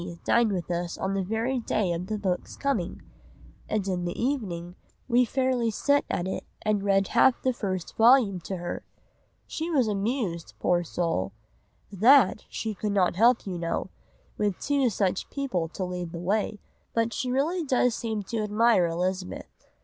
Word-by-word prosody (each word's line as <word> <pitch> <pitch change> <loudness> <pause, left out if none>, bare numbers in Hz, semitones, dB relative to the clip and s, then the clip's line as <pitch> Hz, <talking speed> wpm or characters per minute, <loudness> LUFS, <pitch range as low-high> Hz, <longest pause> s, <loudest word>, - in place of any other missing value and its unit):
dined 235 -2 +3
with 180 -2 -3
us 175 0 -2
on 190 +1 -2
the 195 - 0
very 225 +7 -1
day 215 -5 0
of 175 +2 -4
the 215 - -2
book's 190 -3 -3
coming, 250 -11 -2 0.7
and 210 -3 -1
in 180 -2 -1
the 175 0 -4
evening 190 -10 -2 0.3
we 245 0 +4
fairly 255 -1 +1
set 285 +6 +2
at 175 - -1
it 190 - -3 0.2
and 215 -2 +1
read 195 -1 +2
half 240 +1 +4
the 260 - +2
first 185 -6 -4
vol. 225 -5 +5
to 185 +2 -5
her.... 175 0 -5 0.6
She 320 +2 -4
was 270 -8 +2
amused, 200 -4 -2
poor 175 0 +2
soul! 165 - -2 0.6
That 220 +2 +5
she 220 -1 -3
could 205 +1 -2
not 185 -4 +2
help 235 +5 +4
you 180 -3 -4
know, 170 +2 -2 0.5
with 205 -3 0
two 280 -3 +2
such 190 -3 -1
people 255 - -2
to 180 +3 -5
lead 180 -2 -5
the - - -4
way, 205 +5 -1 0.4
but 230 0 +1
she 275 -3 -2
really 310 +8 0
does 250 -4 +2
seem 220 -3 -3
to 225 +4 -3
admire 210 -3 +3
Elizabeth. 180 +2 -4
205 Hz, 170 wpm, -27 LUFS, 180-240 Hz, 0.7 s, vol